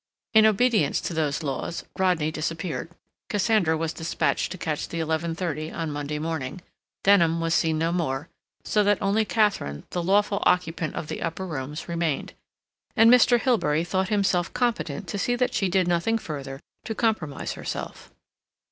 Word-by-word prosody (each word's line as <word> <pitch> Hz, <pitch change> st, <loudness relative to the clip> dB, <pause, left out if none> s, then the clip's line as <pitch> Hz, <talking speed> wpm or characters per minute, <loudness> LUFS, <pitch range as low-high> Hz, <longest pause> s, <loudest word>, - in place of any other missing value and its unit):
In 220 Hz, -1 st, +7 dB
obedience 215 Hz, -, +2 dB
to -, -, -4 dB
those 155 Hz, -1 st, -1 dB
laws, 140 Hz, +4 st, -3 dB
Rodney 180 Hz, -5 st, +1 dB
disappeared; 165 Hz, +1 st, -3 dB, 0.4 s
Cassandra 205 Hz, -6 st, +2 dB
was 160 Hz, 0 st, -2 dB
dispatched 165 Hz, +1 st, -1 dB
to 185 Hz, -, -5 dB
catch 155 Hz, -4 st, -3 dB
the 170 Hz, -, -5 dB
eleven 160 Hz, +1 st, -1 dB
thirty 155 Hz, -3 st, -3 dB
on 165 Hz, -2 st, -3 dB
Monday 145 Hz, +1 st, -3 dB
morning; 160 Hz, 0 st, -4 dB, 0.4 s
Denham 170 Hz, -5 st, +4 dB
was 165 Hz, 0 st, 0 dB
seen 160 Hz, -2 st, +2 dB
no 165 Hz, +1 st, +1 dB
more; 155 Hz, -4 st, -1 dB, 0.4 s
so 210 Hz, -, +2 dB
that 205 Hz, 0 st, +3 dB
only 210 Hz, +2 st, +1 dB
Katharine, 205 Hz, -, 0 dB
the 175 Hz, -, -1 dB
lawful 200 Hz, +3 st, +2 dB
occupant 165 Hz, -3 st, +1 dB
of -, -, -3 dB
the -, -, -5 dB
upper 165 Hz, +3 st, -3 dB
rooms, 150 Hz, -2 st, -5 dB
remained, 170 Hz, -4 st, -2 dB, 0.6 s
and 225 Hz, -1 st, +7 dB
Mr. 245 Hz, -1 st, +6 dB
Hilbery 210 Hz, -, +2 dB
thought 190 Hz, +3 st, -1 dB
himself 195 Hz, -4 st, +1 dB
competent 220 Hz, -, -1 dB
to 200 Hz, +5 st, -3 dB
see 245 Hz, +4 st, +1 dB
that 250 Hz, 0 st, 0 dB
she 195 Hz, -, +1 dB
did 185 Hz, -1 st, +2 dB
nothing 175 Hz, +6 st, +1 dB
further 140 Hz, -8 st, -6 dB, 0.3 s
to 220 Hz, -, -3 dB
compromise 210 Hz, -, -1 dB
herself. -, -, -6 dB
170 Hz, 165 wpm, -25 LUFS, 155-205 Hz, 0.6 s, In